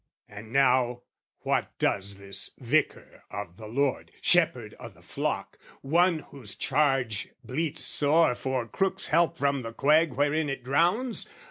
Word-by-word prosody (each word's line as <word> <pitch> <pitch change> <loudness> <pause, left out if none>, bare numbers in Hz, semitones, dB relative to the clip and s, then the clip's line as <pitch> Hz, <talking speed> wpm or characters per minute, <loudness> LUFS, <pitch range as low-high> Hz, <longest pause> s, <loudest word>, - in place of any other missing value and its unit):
And 105 +2 -11
now 125 -2 +2 0.4
what - - -1
does 100 0 0
this 100 0 -4
Vicar 140 +5 -1
of 95 -3 -7
the 110 - -9
Lord, 135 +4 -1
Shepherd 130 -11 +2
o' - - -8
the - - -21
flock, - - -3 0.2
one 170 +3 +3
of - - -18
whose 120 -7 -10
charge 135 -8 0
bleats 150 +6 -3
sore 150 0 +3
For 125 -1 -3
crook's 195 +9 0
help 170 +1 +2
from 140 -1 +1
the 115 -1 -7
quag 155 +6 +3
wherein 145 +1 +1
it 135 -2 -4
drowns? 175 - +1
135 Hz, 145 wpm, -27 LUFS, 115-155 Hz, 0.4 s, one